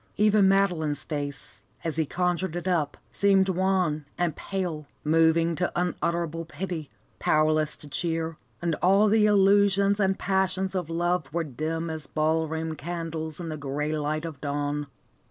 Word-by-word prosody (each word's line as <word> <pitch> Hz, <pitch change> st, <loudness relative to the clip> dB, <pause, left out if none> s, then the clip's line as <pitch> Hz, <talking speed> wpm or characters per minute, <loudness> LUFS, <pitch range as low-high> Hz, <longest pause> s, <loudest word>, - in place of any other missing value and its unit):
Even 210 Hz, -2 st, +5 dB
Madeline's 175 Hz, -7 st, +1 dB
face, 145 Hz, -2 st, -4 dB, 0.2 s
as 165 Hz, -2 st, -1 dB
he 160 Hz, -2 st, +1 dB
conjured 180 Hz, 0 st, -1 dB
it 175 Hz, +1 st, -4 dB
up, 160 Hz, -6 st, 0 dB
seemed 195 Hz, -1 st, +3 dB
wan 185 Hz, -5 st, +1 dB
and 170 Hz, -4 st, 0 dB
pale, 175 Hz, -6 st, -4 dB, 0.2 s
moving 165 Hz, +1 st, +3 dB
to 175 Hz, +2 st, -1 dB
unutterable 170 Hz, -2 st, -1 dB
pity, 170 Hz, -2 st, -5 dB, 0.3 s
powerless 155 Hz, 0 st, +2 dB
to 150 Hz, -, -11 dB
cheer, 165 Hz, +2 st, -2 dB, 0.3 s
and 170 Hz, -1 st, +1 dB
all 195 Hz, +4 st, +5 dB
the 210 Hz, 0 st, +4 dB
illusions 200 Hz, 0 st, +4 dB
and 195 Hz, -1 st, +2 dB
passions 190 Hz, 0 st, 0 dB
of 180 Hz, -4 st, -2 dB
love 175 Hz, -3 st, 0 dB
were 170 Hz, +2 st, 0 dB
dim 160 Hz, +4 st, -3 dB
as 160 Hz, -1 st, -6 dB
ball 160 Hz, +1 st, +1 dB
room 160 Hz, 0 st, -3 dB
candles 160 Hz, 0 st, -5 dB
in 170 Hz, -2 st, -5 dB
the 155 Hz, -, -4 dB
grey 150 Hz, +2 st, -2 dB
light 155 Hz, +1 st, -2 dB
of 155 Hz, -5 st, -7 dB
dawn. 145 Hz, 0 st, -2 dB
165 Hz, 155 wpm, -27 LUFS, 155-185 Hz, 0.3 s, Even